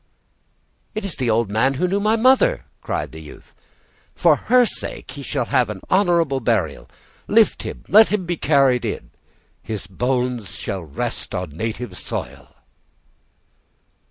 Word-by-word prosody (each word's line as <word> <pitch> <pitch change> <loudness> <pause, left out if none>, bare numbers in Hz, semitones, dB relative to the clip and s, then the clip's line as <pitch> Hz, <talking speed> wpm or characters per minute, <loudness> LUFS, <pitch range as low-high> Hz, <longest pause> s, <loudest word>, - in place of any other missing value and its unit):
"It 215 -1 -3
is 190 - -4
the 125 -3 0
old 110 -2 +1
man 130 +6 +2
who 180 +7 0
knew 195 +3 0
my 215 +2 +2
mother!" 265 - +3 0.2
cried - - -3
the - - -10
youth. - - -14 0.6
"For - - +4
her 250 0 +4
sake 215 - -6
he 140 +2 -8
shall 135 -2 -2
have 120 -7 0
honorable 170 -8 +3
burial; 110 - -1 0.4
lift 225 0 +3
him, - - -7
and - - -16
let 220 +1 +8
him 210 -4 0
be 175 0 -1
carried 135 -5 +3
in; - - -4 0.5
his 105 -4 -5
bones 125 +2 -2
shall 100 -3 -4
rest 75 -4 -4
on 90 -3 -4
native 110 +9 -5
soil." - - -6
130 Hz, 150 wpm, -21 LUFS, -, 0.6 s, let